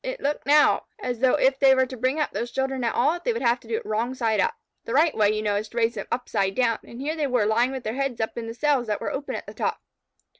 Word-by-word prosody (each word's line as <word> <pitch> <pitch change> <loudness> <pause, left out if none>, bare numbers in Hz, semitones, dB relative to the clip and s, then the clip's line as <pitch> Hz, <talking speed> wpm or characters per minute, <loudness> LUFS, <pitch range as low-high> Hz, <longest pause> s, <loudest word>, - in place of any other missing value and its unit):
It - - -4
looked 285 +1 -2
now 295 +1 +4
as 250 - -4
though 260 0 +4
if 265 +1 +2
they 270 -1 +6
were 260 0 +3
to 255 - -8
bring 255 +5 0
up 300 - 0
those 240 - -3
children 265 0 -2
at 230 - 0
all, 300 +8 +2
they 475 +7 -1
would 455 - -4
have 240 +1 +3
to 230 - -18
do 225 - -1
it - - -4
wrong 230 +4 -1
side 225 -4 0
up. 460 0 +1 0.3
The 230 - -3
right 310 +2 +4
way, 210 -2 +3
you 215 0 -2
know, 205 -1 +1
is 210 +1 -4
to 235 - -11
raise 230 0 +2
them 225 - -6
upside 200 -6 -1
down, 235 -3 +1
and 235 - -11
here 300 +4 -2
they 305 -3 -1
were 250 -5 +1
lying 235 +4 +2
with 265 -2 -5
their 220 - -3
heads 270 -2 -2
up 220 - -2
in 230 -1 -5
cells 270 -2 +1
that 210 -1 -1
were - - -3
open 280 +1 -4
at - - -6
the - - -9
top. - - -2
250 Hz, 300 wpm, -25 LUFS, 225-275 Hz, 0.3 s, they